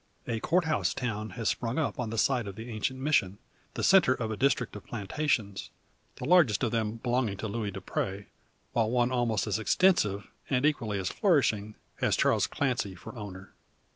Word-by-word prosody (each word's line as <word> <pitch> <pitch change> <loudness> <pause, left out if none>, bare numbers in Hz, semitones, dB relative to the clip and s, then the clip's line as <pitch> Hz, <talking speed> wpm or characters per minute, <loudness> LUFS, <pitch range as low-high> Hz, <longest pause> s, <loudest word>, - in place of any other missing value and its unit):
A 115 -1 -1
Court 170 +8 +2
House 155 -1 0
town 110 -4 -3
has 115 -2 -2
sprung 120 +3 -1
up 150 -3 -1
on 120 -3 -2
the 115 - -4
site 125 -2 +2
of 100 - -6
the 115 +3 -8
ancient 120 +4 -2
Mission, 130 -9 +1 0.4
the - - -3
centre 185 -9 +5
of 115 -3 -3
a - - -2
district 125 -1 +1
of 105 - -8
plantations 105 -2 -2 0.5
the - - -6
largest 145 - +4
of 115 - +1
them 110 -1 -1
belonging 120 -3 -1
to 110 - -4
Luis 105 -1 -3
Dupre; 95 +1 -4 0.5
while 115 -2 +2
one 120 +1 +2
almost 120 -5 +1
as 105 0 -1
extensive, 105 - +2 0.2
and 130 0 +2
equally 115 -9 0
as 95 -1 -2
flourishing, 110 - +1 0.2
has - - +1
Charles - - +3
Clancy 120 -9 -1
for 90 - -10
owner. 100 -3 -9
115 Hz, 185 wpm, -29 LUFS, 105-130 Hz, 0.5 s, centre